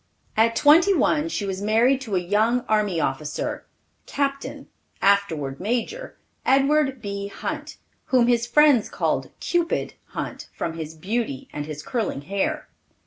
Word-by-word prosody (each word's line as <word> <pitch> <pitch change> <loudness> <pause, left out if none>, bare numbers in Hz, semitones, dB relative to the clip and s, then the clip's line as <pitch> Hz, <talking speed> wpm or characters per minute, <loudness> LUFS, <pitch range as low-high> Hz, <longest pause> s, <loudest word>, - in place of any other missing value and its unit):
At 230 +1 +3
twenty 335 +10 +6
one 310 -1 +2
she 210 - -2
was 190 0 -3
married 235 +6 +3
to 220 -7 -3
a - - +3
young 215 +7 +2
army 210 -6 +1
officer, 145 +1 -3 0.4
Captain, 275 -1 -3 0.3
afterward 170 -9 +1
Major, 245 - -3 0.3
Edward 275 -1 +2
B. 200 0 -4
Hunt, 305 +8 -6 0.3
whom 250 -2 +3
his 240 -1 +2
friends 280 -3 +5
called - - -1
"Cupid" 345 -1 0
Hunt - - -6
from 165 - -3
his 160 -1 -6
beauty 190 - -3
and 145 0 -4
his 150 -1 -6
curling 225 - -2
hair. 290 - -2
225 Hz, 140 wpm, -24 LUFS, 190-275 Hz, 0.4 s, twenty